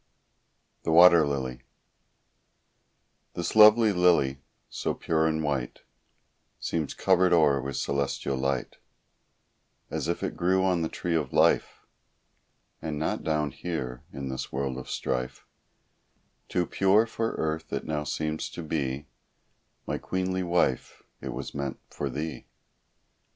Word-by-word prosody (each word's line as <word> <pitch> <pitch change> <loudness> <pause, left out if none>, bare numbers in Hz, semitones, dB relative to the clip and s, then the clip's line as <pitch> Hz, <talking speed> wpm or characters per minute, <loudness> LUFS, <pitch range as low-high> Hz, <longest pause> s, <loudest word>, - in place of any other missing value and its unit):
THE - - -1
WATER 85 -2 +7
LILY 65 -3 -3 1.7
This 85 +3 -3
lovely 110 0 +7
lily, 85 -7 +3 0.3
so - - -3
pure 80 -1 +1
and 80 0 -1
white, 70 -5 -3 0.8
Seems 80 -4 -2
covered 95 -1 +3
o'er 75 -5 +4
with 70 0 -4
celestial 70 0 -1
light; 65 -1 -2 1.1
As - - -2
if 85 - -2
it - - -2
grew 95 +2 +2
on 90 -3 +2
the 80 - -1
"Tree 85 - -3
of 80 -5 -1
Life," - - +2 1.0
And 80 -2 -4
not 80 - -2
down 75 -2 0
here, 65 -6 -5
in 70 -1 -6
this 65 - -5
world 65 -1 -2
of 65 - -10
strife; 65 -1 -3 1.0
Too 90 - +1
pure 95 +6 +3
for 115 0 -2
earth 80 0 -3
it - - -3
now 75 -1 -2
seems 75 +1 -3
to 85 - -6
be; 70 -3 -2 0.8
My - - -3
queenly 95 0 -2
wife, 85 -8 0 0.2
it - - -5
was - - -6
meant 70 -2 -4
for - - -3
thee. 75 +1 -5
80 Hz, 130 wpm, -27 LUFS, 70-90 Hz, 1.7 s, WATER